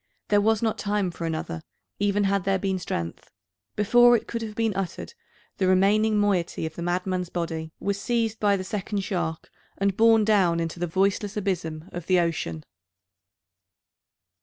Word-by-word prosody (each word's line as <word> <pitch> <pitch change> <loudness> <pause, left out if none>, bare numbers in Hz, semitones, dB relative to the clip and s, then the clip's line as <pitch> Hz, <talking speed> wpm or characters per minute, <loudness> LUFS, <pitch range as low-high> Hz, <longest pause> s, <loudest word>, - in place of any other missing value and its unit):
There 205 -1 +4
was 220 +1 +2
not 220 -1 0
time 205 -3 0
for 170 -1 -5
another, 155 - -4 0.4
even 205 0 +2
had 200 -1 +1
there 195 +1 +1
been 190 0 -1
strength. 85 - -5 0.5
Before 240 +3 +6
it - - -9
could 230 - -4
have 215 -2 -6
been 225 -2 0
uttered, 195 - -4 0.4
the 190 - +1
remaining 210 +3 +3
moiety 190 -6 0
of 160 - -5
the 170 - -7
madman's 180 +1 -1
body 165 -2 -4
was 200 0 -2
seized 230 -2 0
by 205 -1 +3
the 185 - -4
second 200 +1 -3
shark, 175 -5 -3 0.3
and 195 -1 +1
borne 225 0 +5
down 190 -6 +3
into 165 +1 -3
the 175 - -1
voiceless 195 +4 0
abysm 170 -6 -2
of 175 -1 -7
the 185 -1 +4
ocean! 145 - -2
195 Hz, 165 wpm, -25 LUFS, 175-210 Hz, 0.5 s, Before